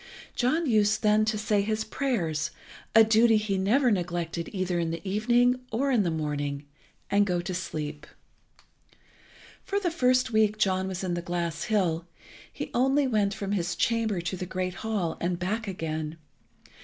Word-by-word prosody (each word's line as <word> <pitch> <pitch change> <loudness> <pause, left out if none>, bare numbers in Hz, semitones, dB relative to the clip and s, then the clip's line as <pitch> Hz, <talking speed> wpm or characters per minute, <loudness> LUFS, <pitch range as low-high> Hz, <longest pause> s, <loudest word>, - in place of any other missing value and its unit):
John 310 +7 +1
used 215 -3 +2
then 215 0 +4
to 215 0 0
say 210 -1 +1
his 215 +2 -1
prayers, 175 - -1 0.5
a 225 - +9
duty 225 +1 +5
he 210 -2 -1
never 235 +7 +3
neglected 175 -3 -2
either 185 -3 -1
in 165 -1 -1
the 165 +4 -5
evening 240 +5 +3
or 270 +5 0
in 240 -5 +4
the 180 - 0
morning, 145 -2 -3 0.5
and 205 +1 +4
go 180 -3 0
to 180 +2 -4
sleep. 150 -4 -5 1.6
For 400 - -1
the 360 -4 -1
first 255 -6 +2
week 215 -1 +3
John 190 -2 +1
was 190 0 -4
in 180 -2 -1
the 175 - -2
glass 170 -2 -3
hill, 180 -6 0 0.4
he - - -6
only 270 +3 +3
went 210 -5 +1
from 200 0 -4
his 175 -4 -1
chamber 225 -5 0
to 175 +2 -3
the 180 0 -5
great 185 0 -2
hall 205 -7 -2
and 175 0 0
back 210 +5 -2
again. 160 -4 -4
200 Hz, 165 wpm, -27 LUFS, 175-220 Hz, 1.6 s, a